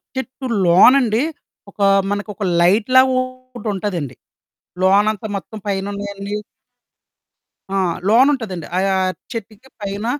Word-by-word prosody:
చెట్టు 260 0 -6 0.2
లోనండి, 230 +7 +5 0.5
ఒకా 200 -1 +1 0.2
మనకొక 205 0 -4 0.2
లైట్‌లాగొకటుంటదండి. 225 - +1 0.7
లోనంతా 205 +2 +2
మొత్తం 220 +3 -9
పైనున్నయన్నీ 200 +1 -4 1.4
ఆ! - - -2 0.3
లోనుంటదండి. 225 - +2
అయా 195 0 +1 0.4
చెట్టుకి 225 +3 -8
పైన 200 +2 -4
210 Hz, 75 wpm, -19 LUFS, 195-255 Hz, 1.4 s, లోనండి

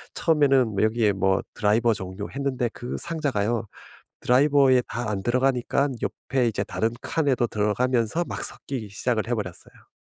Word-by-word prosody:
처음에는 140 -7 +3
뭐 100 -1 -1
여기에 110 -1 +2
뭐 95 0 +1
드라이버 115 +2 +2
종류 95 0 -6
했는데 135 -3 -1
그 120 - -6
상자가요, 120 -9 -1 0.5
드라이버에 135 -1 +4
다 115 0 -3
안 100 -2 -3
들어가니까 130 +3 +1
옆에 130 -2 -1
이제 110 - -1
다른 110 +1 -1
칸에도 140 -7 +1
들어가면서 115 - 0
막 - - -4
섞이기 120 -7 -4
시작을 110 +2 -1
해 120 - 0
버렸어요. 95 -5 -8
120 Hz, 365 characters per minute, -25 LUFS, 105-135 Hz, 0.5 s, 드라이버에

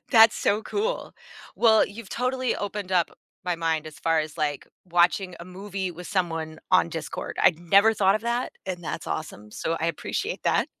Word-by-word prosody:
That's 225 -1 +8
so 210 +2 +1
cool. 450 +5 -2 0.4
Well, 220 -2 +5
you've 205 +1 -10
totally 255 0 0
opened 205 -2 -4
up 175 -2 +3 0.3
my 180 -2 0
mind 160 -2 -1
as 155 -1 -10
far 165 -1 +2
as, 155 -1 -6
like, 145 -2 -2 0.2
watching 175 +1 +2
a - - -7
movie 190 0 -5
with 175 +1 -9
someone 165 -4 -2
on 85 - +5
Discord; - - -5
I'd 160 - +5
never 200 +6 +5
thought 195 -2 +4
of - - -6
that, 235 +2 -1
and 180 -2 -4
that's 165 - -4
awesome, 105 -9 -5
so 165 - -2
I 165 - +1
appreciate 165 - -3
that. - - +2
180 Hz, 185 wpm, -26 LUFS, 165-210 Hz, 0.4 s, That's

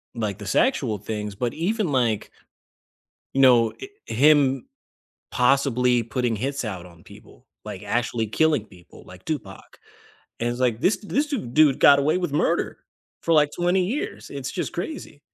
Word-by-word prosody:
like, 105 -4 -3
the 105 - -8
sexual 130 - +1
things, 105 0 -5
but 120 +3 -2
even 195 +1 -1
like 120 -6 0 1.1
No, 125 -4 +5
it 395 - -9 0.2
Him 140 - +3 0.6
possibly 125 -2 +2
putting 115 +1 -2
hits 135 +5 -3
out 95 -5 -6
on 85 -2 -17
people, - - -17 0.2
like, 95 - -7
actually 115 +1 -1
killing 150 +1 +1
people, 90 -4 -17
like 95 0 -14
Tupac, 155 -6 -7 0.6
and 120 +1 0
it's 120 +1 -5
like, 120 -3 +1
this 190 - +2
this 275 +8 -1
du 285 -3 -1
dude 140 - +3
got 140 - +7
away 150 +5 +1
with 175 -5 -3
murder 145 - 0 0.4
for, 165 - 0
like, 150 -1 +4
20 180 +1 +1
years, 240 +11 -4
it's 140 -2 -5
just 185 - -4
crazy. 175 - -6
130 Hz, 155 wpm, -23 LUFS, 115-155 Hz, 1.1 s, got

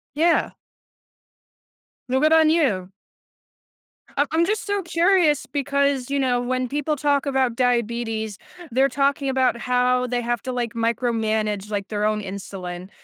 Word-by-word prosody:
Yeah. 335 +3 +2 1.6
No, 260 +1 +1
good 310 +3 +4
on 320 -1 +5
you. 220 - +1 1.3
I 285 - +3
I'm 330 +1 +3
just 425 +2 -1
so 405 -1 -1
curious 340 -3 +2
because, 280 -2 0
you 280 - 0
know, 250 -2 +1
when 255 +1 -1
people 295 +3 -1
talk 285 0 +1
about 265 -4 +1
diabetes, 235 -3 -1 0.3
they're 265 +3 +3
talking 280 0 0
about 260 -2 +2
how 250 +1 +1
they 245 0 -1
have 240 -2 -2
to, 260 - -3
like, 240 -2 -3
micromanage, 220 -3 -1
like, 200 -1 -2
their 210 -1 -1
own 215 0 0
insulin 190 -2 -7
250 Hz, 145 wpm, -23 LUFS, 225-285 Hz, 1.6 s, on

